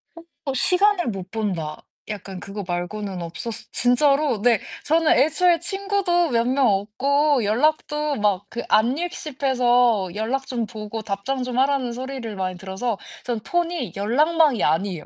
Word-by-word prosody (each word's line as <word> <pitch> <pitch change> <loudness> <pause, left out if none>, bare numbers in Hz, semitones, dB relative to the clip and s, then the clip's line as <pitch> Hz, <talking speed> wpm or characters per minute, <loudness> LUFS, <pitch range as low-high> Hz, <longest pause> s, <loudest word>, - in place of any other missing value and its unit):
어 335 - -10 0.2
어. 275 - -1
'시간을 365 +3 +3
못 190 -4 -5
본다.' 180 -9 -3 0.3
약간 195 -3 -6
그거 200 0 -6
말고는 180 +1 -4
없었어 195 +7 -6
진짜로 260 +1 +2
네 235 -5 +4 0.2
저는 320 +1 +3
애초에 335 +5 +3
친구도 390 -2 0
몇 235 -2 +2
명 260 0 +3
없고 260 +8 +2
연락도 300 +6 +1
막 205 -1 +1
그 235 - -4
안읽씹 285 +4 0
해서 245 -6 +3
연락 250 +6 -2
좀 240 -3 -2
보고 220 -1 -6
답장 215 +6 -3
좀 250 -1 -4
하라는 265 -2 +2
소리를 255 -3 -5
많이 185 -1 -3
들어서 195 +4 -3 0.3
전 240 -3 -2
폰이 345 +7 -2
연락망이 290 - +2
아니에요. 165 +1 0
245 Hz, 295 characters per minute, -23 LUFS, 205-295 Hz, 0.3 s, 네